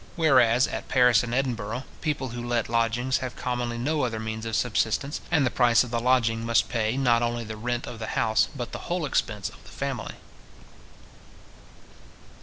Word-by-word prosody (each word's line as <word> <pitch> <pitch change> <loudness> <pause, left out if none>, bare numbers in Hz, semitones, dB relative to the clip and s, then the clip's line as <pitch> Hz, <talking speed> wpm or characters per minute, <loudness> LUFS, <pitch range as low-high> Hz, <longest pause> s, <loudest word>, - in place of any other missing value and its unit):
Whereas 130 -6 +4
at - - -5
Paris 125 -3 +5
and 115 - -4
Edinburgh, 125 -2 -2 0.2
people 145 -4 -2
who 120 +1 -6
let 120 -2 0
lodgings 115 +3 +1
have 130 -2 -5
commonly 120 -1 -3
no 150 +5 0
other 115 -4 -1
means 110 0 -4
of 110 - -2
subsistence; 125 +5 0
and 150 -5 +3
the 125 - +1
price 120 -1 +4
of 125 - -8
the 120 - 0
lodging 115 -2 +2
must 115 -2 +2
pay, 115 +1 0
not 120 -3 +3
only 120 0 -1
the 110 -1 -7
rent 120 +2 -3
of 115 - -8
the 110 - -5
house, 110 0 +3
but 120 -3 -5
the - - -8
whole 175 -2 0
expense 105 -7 -1
of - - -16
the - - -15
family. - - -4
120 Hz, 185 wpm, -26 LUFS, 115-130 Hz, 0.2 s, Paris